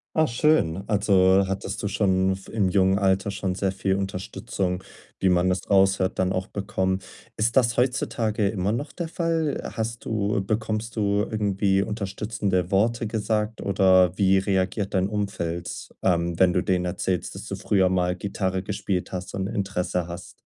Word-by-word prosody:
Ah, 160 Hz, -1 st, +4 dB
schön. 115 Hz, -, +2 dB
Also 100 Hz, -2 st, +4 dB
hattest 95 Hz, +1 st, -4 dB
du 100 Hz, -, -1 dB
schon 95 Hz, -2 st, +2 dB
v 95 Hz, -, -13 dB
im 100 Hz, -4 st, +1 dB
jungen 95 Hz, 0 st, +3 dB
Alter 95 Hz, 0 st, +1 dB
schon 95 Hz, -2 st, -2 dB
sehr 95 Hz, 0 st, 0 dB
viel 95 Hz, 0 st, 0 dB
Unterstützung, 95 Hz, -1 st, -3 dB, 0.4 s
wie 95 Hz, -, +3 dB
man 90 Hz, 0 st, +3 dB
das 90 Hz, -1 st, -2 dB
raushört, 95 Hz, -1 st, +3 dB
dann 95 Hz, 0 st, +2 dB
auch 95 Hz, 0 st, -1 dB
bekommen. 95 Hz, -2 st, -2 dB, 0.4 s
Ist 115 Hz, +4 st, +1 dB
das 120 Hz, -2 st, +3 dB
heutzutage 120 Hz, -4 st, 0 dB
immer 100 Hz, -1 st, -1 dB
noch 120 Hz, +7 st, -3 dB
der 170 Hz, -, -4 dB
Fall? 165 Hz, -2 st, -1 dB, 0.2 s
Hast 115 Hz, 0 st, -4 dB
du 105 Hz, -2 st, 0 dB
bekommst 110 Hz, +2 st, -2 dB
du 100 Hz, -1 st, +2 dB
irgendwie 100 Hz, -2 st, +1 dB
unterstützende 100 Hz, -3 st, -2 dB
Worte 115 Hz, +4 st, +1 dB
gesagt, 110 Hz, 0 st, -1 dB
oder 95 Hz, -2 st, +4 dB
wie 95 Hz, -1 st, +4 dB
reagiert 95 Hz, +1 st, 0 dB
dein 95 Hz, +1 st, +1 dB
Umfeld, 90 Hz, -5 st, -3 dB
ähm, 85 Hz, -2 st, +1 dB
wenn 90 Hz, -1 st, +5 dB
du 90 Hz, -, +2 dB
denen 90 Hz, -1 st, 0 dB
erzählst, 90 Hz, 0 st, -2 dB
dass -, -, -8 dB
du -, -, -4 dB
früher 95 Hz, -2 st, +2 dB
mal 90 Hz, -1 st, +1 dB
Gitarre 95 Hz, -1 st, -2 dB
gespielt 95 Hz, -2 st, -3 dB
hast 90 Hz, 0 st, -5 dB
und 95 Hz, 0 st, -2 dB
Interesse 90 Hz, -3 st, -2 dB
hast? 85 Hz, +1 st, -9 dB
95 Hz, 165 wpm, -25 LUFS, 95-105 Hz, 0.4 s, wenn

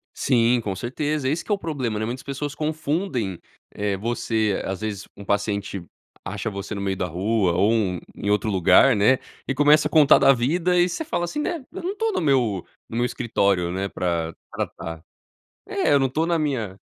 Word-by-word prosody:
Sim, 120 Hz, 0 st, +3 dB
com 100 Hz, -4 st, -3 dB
certeza. 145 Hz, +6 st, -2 dB
Esse 155 Hz, +5 st, 0 dB
que -, -, -6 dB
é -, -, +5 dB
o -, -, -8 dB
problema, 135 Hz, -, -3 dB
né. 110 Hz, -, -1 dB
Muitas 125 Hz, +3 st, -5 dB
pessoas 140 Hz, +1 st, -4 dB
confundem, 150 Hz, -, -2 dB, 0.3 s
eh, 105 Hz, -1 st, -1 dB
você, 110 Hz, -1 st, -1 dB
às 95 Hz, +2 st, -4 dB
vezes, 105 Hz, -2 st, -4 dB
um 100 Hz, -, -10 dB
paciente 100 Hz, -2 st, -1 dB, 0.4 s
acha 100 Hz, +3 st, -4 dB
você 100 Hz, +1 st, -5 dB
no 100 Hz, -, -4 dB
meio 95 Hz, -1 st, -1 dB
da 90 Hz, -1 st, -2 dB
rua 95 Hz, +2 st, +1 dB
ou 100 Hz, +5 st, +3 dB
um 95 Hz, -6 st, 0 dB, 0.2 s
em 100 Hz, -, -3 dB
outro 105 Hz, +1 st, +1 dB
lugar, 105 Hz, +7 st, +5 dB
né, 105 Hz, +6 st, +4 dB, 0.3 s
e -, -, 0 dB
começa 150 Hz, +2 st, +5 dB
a -, -, -13 dB
contar 150 Hz, -3 st, +6 dB
da 135 Hz, -, +6 dB
vida 165 Hz, +9 st, +1 dB
e 175 Hz, -, +4 dB
você 185 Hz, -, -3 dB
fala 235 Hz, -, -2 dB
assim, 175 Hz, -, -4 dB
né: 320 Hz, -3 st, -3 dB
"Eu 380 Hz, +2 st, -7 dB
não 370 Hz, +4 st, -3 dB
tô 450 Hz, +1 st, 0 dB
no -, -, -1 dB
meu 125 Hz, -, +2 dB, 0.2 s
no -, -, -8 dB
meu 120 Hz, -, +2 dB
escritório, 100 Hz, -8 st, 0 dB
né, 95 Hz, +2 st, -2 dB
pra 85 Hz, -3 st, -2 dB, 0.2 s
tratar“. 80 Hz, -1 st, -5 dB, 0.7 s
É. -, -, +1 dB
Eu 140 Hz, -, +6 dB
não 135 Hz, -, +2 dB
tô 155 Hz, +6 st, 0 dB
na 170 Hz, -1 st, +1 dB
minha 120 Hz, -11 st, -2 dB
115 Hz, 205 wpm, -23 LUFS, 100-150 Hz, 0.7 s, contar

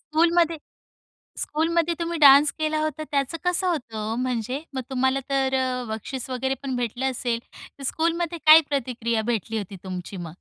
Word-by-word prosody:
स्कूलमध्ये 335 Hz, 0 st, +3 dB, 0.8 s
स्कूलमध्ये 335 Hz, +2 st, 0 dB
तुम्ही 335 Hz, 0 st, -2 dB
डान्स 285 Hz, 0 st, +8 dB
केला 310 Hz, 0 st, 0 dB
होता, 310 Hz, 0 st, -2 dB
त्याचं 280 Hz, +2 st, 0 dB
कसं 360 Hz, +1 st, +1 dB
होतं 270 Hz, -10 st, -2 dB, 0.2 s
ओ -, -, -3 dB
म्हणजे? 250 Hz, +1 st, -2 dB
मग 260 Hz, -, -2 dB
तुम्हाला 265 Hz, +1 st, +1 dB
तर 270 Hz, -1 st, +1 dB
अ, 255 Hz, -1 st, -1 dB
बक्षीस 230 Hz, +4 st, -5 dB
वगैरे 265 Hz, +1 st, -1 dB
पण 265 Hz, -2 st, -2 dB
भेटलं 245 Hz, +1 st, -2 dB
असेल, 240 Hz, -2 st, -2 dB, 0.4 s
तर 275 Hz, -, -8 dB
स्कूलमध्ये 335 Hz, +3 st, 0 dB
काय 310 Hz, +1 st, +10 dB
प्रतिक्रिया 235 Hz, -5 st, -1 dB
भेटली 225 Hz, 0 st, -2 dB
होती 200 Hz, -2 st, -5 dB
तुमची 185 Hz, +1 st, -6 dB
मग? 175 Hz, -2 st, -6 dB
270 Hz, 160 wpm, -24 LUFS, 245-315 Hz, 0.8 s, काय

